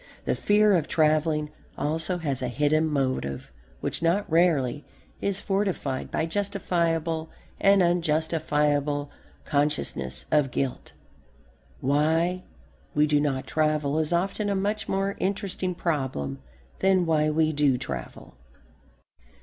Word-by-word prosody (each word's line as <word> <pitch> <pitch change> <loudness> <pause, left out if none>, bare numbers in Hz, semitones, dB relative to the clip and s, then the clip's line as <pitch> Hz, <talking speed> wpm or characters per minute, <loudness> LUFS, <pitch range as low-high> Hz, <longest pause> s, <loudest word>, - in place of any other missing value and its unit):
The - - +1
fear 210 0 +3
of 160 -4 0
travelling 155 -1 +2 0.3
also 160 +4 0
has 140 -6 -2
a 125 - -1
hidden 150 +5 +2
motive 130 - -2 0.3
which - - -3
not 175 +5 +1
rarely 150 -5 +2 0.4
is 200 0 0
fortified 195 -11 -1
by - - -1
justifiable 165 -4 -1 0.3
and 195 -1 +5
unjustifiable 150 -4 +1 0.3
consciousness 140 - -1
of 150 -3 +3
guilt. 130 +1 -3 0.9
Why 160 +6 +2 0.5
we 150 0 +4
do 150 -1 +2
not 135 -3 -1
travel 155 -1 +1
is 155 +1 0
often 195 +4 0
a 200 - +1
much 205 +2 -2
more 195 +1 0
interesting 185 -1 -2
problem 130 - -2 0.4
than 190 -2 +3
why 155 -2 +2
we 155 +1 +2
do 145 -3 +3
travel. 65 - -7
155 Hz, 115 wpm, -26 LUFS, 145-180 Hz, 0.9 s, and